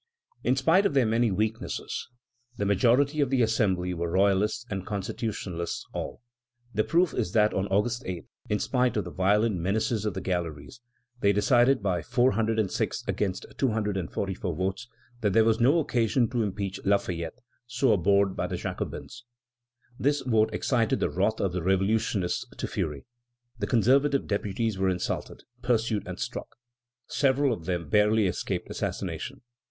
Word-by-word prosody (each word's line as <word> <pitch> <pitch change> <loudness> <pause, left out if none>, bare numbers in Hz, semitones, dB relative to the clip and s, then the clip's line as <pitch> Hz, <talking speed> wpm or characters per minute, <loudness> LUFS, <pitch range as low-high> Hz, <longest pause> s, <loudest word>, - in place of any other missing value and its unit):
In 130 - +3
spite 165 +9 +4
of 145 - -5
their 130 -3 +4
many 115 +1 +2
weaknesses, 110 +4 -2 0.5
the 100 - -1
majority 125 +9 +3
of 140 - +2
the 130 -2 +3
Assembly 95 -5 +1
were 85 -1 -2
royalists 100 +5 +2
and 95 -5 -4
constitutionalists 95 -3 -4
still. - - -6 0.5
The 110 +1 +2
proof 170 +2 +2
is 105 -6 -2
that 105 -1 +4
on 95 +1 0
August 115 +5 +1
8, 90 -3 -5 0.2
in 105 - +2
spite 125 0 +1
of 105 - +1
the - - -7
violent 105 +2 +2
menaces 105 +5 0
of 105 -3 -2
the - - -2
galleries, 85 - -4 0.4
they 100 -3 +4
decided 120 +4 +3
by 90 -4 0
406 115 - +1
against 95 -2 -1
244 100 - -1
votes, 95 +7 -2 0.3
that 105 -4 +1
there 115 - +6
was 110 0 +3
no 135 +8 +5
occasion 120 -5 +2
to 120 - 0
impeach 100 -2 -3
Lafayette, 95 -2 0 0.3
so 125 +2 +2
abhorred 100 +1 +3
by - - -1
the - - -3
Jacobins. 120 0 -6 0.7
This 145 +2 +2
vote 110 -4 +2
excited 115 -4 +1
the - - 0
wrath 100 +5 0
of 95 - 0
the 90 - -2
revolutionists 95 0 +1
to - - -3
fury. 75 -3 -3 0.5
The 100 - -1
conservative 135 +4 +3
deputies 105 0 -1
were 95 0 +2
insulted, 90 -1 -3 0.2
pursued, 115 -4 0
and - - -5
struck. - - -5 0.5
Several 135 -1 +2
of 85 -7 -7
them 85 -3 -2
barely 105 +3 +3
escaped 90 - -2
assassination. - - -4
105 Hz, 155 wpm, -27 LUFS, 95-120 Hz, 0.7 s, there